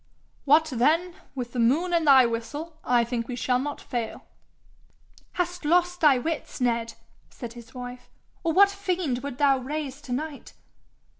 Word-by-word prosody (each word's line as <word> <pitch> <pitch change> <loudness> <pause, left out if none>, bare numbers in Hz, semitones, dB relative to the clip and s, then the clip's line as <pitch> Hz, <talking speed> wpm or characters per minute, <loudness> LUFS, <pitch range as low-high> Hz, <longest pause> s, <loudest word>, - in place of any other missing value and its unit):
'What 305 +3 +5
then 325 +9 +2 0.2
with 245 -2 -5
the 250 - -3
moon 300 +10 +2
and 335 -2 +2
thy 265 -3 +8
whistle, 290 +8 -5
I 240 -1 +3
think 235 -1 -3
we 250 - -4
shall 250 0 +1
not 290 +2 -4
fail.' 240 -4 -5 1.1
'Hast 355 -1 -2
lost 355 +3 +2
thy 295 -4 +6
wits, 310 +4 -4
Ned?' 230 -2 0 0.3
said 235 -3 -8
his 235 0 -13
wife. 250 0 -8 0.3
'Or 335 - +1
what 400 +4 +6
fiend 365 -10 -2
wouldst 275 -1 -6
thou 275 -2 +4
raise 285 +1 -5
to 280 - -10
night?' 290 +3 -5
275 Hz, 160 wpm, -26 LUFS, 245-325 Hz, 1.1 s, thy